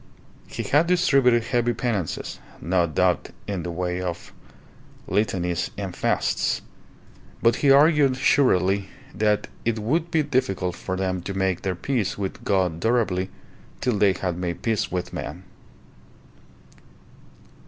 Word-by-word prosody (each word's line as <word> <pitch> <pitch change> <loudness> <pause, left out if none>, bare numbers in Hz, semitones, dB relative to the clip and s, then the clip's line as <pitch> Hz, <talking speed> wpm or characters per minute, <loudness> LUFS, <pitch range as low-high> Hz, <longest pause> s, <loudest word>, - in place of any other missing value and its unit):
He - - -5
had 150 +4 +3
distributed 140 -10 +4
heavy 120 0 0
penances, 110 -8 -3 0.2
no 85 +1 +1
doubt 75 - +1 0.2
in 100 -3 -3
the 85 - -5
way 90 +1 -2
of 90 -2 -5 0.7
litanies 90 -4 0
and 95 -3 -5
fasts; - - 0 0.8
but 115 0 +3
he 145 - +2
argued 140 -2 +5
shrewdly 100 -8 +3 0.2
that 105 -1 +1 0.2
it 115 -1 0
would 155 +11 0
be 160 -2 +2
difficult 95 -11 -1
for 95 - -4
them 95 -1 -1
to 95 +2 -5
make 95 -2 0
their 95 -2 -2
peace 115 +1 -1
with 95 -2 -4
God 90 -5 +1
durably 100 -4 +1 0.5
till 125 -5 0
they 100 -2 +5
had 90 -2 -3
made 85 -1 -4
peace 110 -3 0
with 90 -1 -3
men. 85 +6 -6
100 Hz, 130 wpm, -24 LUFS, 90-125 Hz, 0.8 s, argued